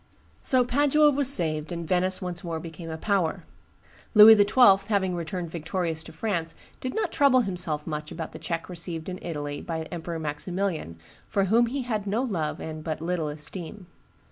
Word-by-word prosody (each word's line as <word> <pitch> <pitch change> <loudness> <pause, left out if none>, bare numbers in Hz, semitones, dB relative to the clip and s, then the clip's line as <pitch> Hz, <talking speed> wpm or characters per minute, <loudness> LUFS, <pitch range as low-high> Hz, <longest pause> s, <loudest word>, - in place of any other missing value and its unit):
So 255 -3 +3
Padua 290 +4 +4
was 280 -1 +2
saved, 155 - 0
and 170 -1 -4
Venice 185 +1 +1
once 175 -1 -5
more 165 -2 -3
became 165 0 -8
a 160 - -4
power. 185 -3 0 0.7
Louis 215 +1 +11
XII., 205 -2 +5
having 195 -4 +1
returned 170 0 -4
victorious 165 -1 -3
to - - -10
France, 165 -2 -3 0.2
did 255 - -4
not 445 - -1
trouble 275 -3 +4
himself 175 -7 -2
much 150 -1 -5
about 160 -1 -6
the 160 - -9
check 165 0 -4
received 170 -1 -3
in 185 0 -6
Italy 145 -3 -4
by 160 -1 -4
Emperor 170 -1 -5
Maximilian, 160 - -3 0.3
for 200 - +1
whom 230 +5 +3
he 265 +3 -3
had 215 -4 -3
no 220 +6 0
love 170 -12 -2
and 155 -1 -6
but 155 -1 -3
little 165 -1 -2
esteem. 165 +6 -6
175 Hz, 175 wpm, -26 LUFS, 160-210 Hz, 0.7 s, Louis